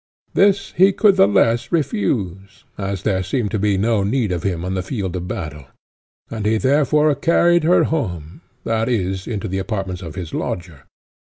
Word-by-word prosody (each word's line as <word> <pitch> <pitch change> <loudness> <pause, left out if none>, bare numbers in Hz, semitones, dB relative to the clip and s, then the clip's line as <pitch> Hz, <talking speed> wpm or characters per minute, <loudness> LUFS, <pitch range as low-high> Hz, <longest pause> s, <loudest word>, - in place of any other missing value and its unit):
This 200 0 +2
he 190 +3 +4
could 200 0 +4
the 95 - +5
less 115 +3 +2
refuse, 100 - -2
as 95 -1 -4
there 95 -3 +1
seemed 110 +1 -2
to 105 - -1
be 100 -1 +1
no 110 +1 +1
need 110 0 0
of 90 -2 -2
him 90 -2 -2
on 95 - -2
the 95 - -1
field 95 -1 -4
of 90 0 -4
battle; 75 -6 -6 0.6
and 110 -2 -4
he 110 +1 +2
therefore 145 +4 +3
carried 170 +2 +3
her 175 +2 +4
home, 90 - -3 0.2
that 115 +1 0
is, 95 -5 -2
into 110 -1 -3
the 95 0 -2
apartments 95 -3 -4
of 80 -4 -8
his 85 -4 -6
lodger. 85 -7 -5
100 Hz, 180 wpm, -20 LUFS, 95-130 Hz, 0.6 s, the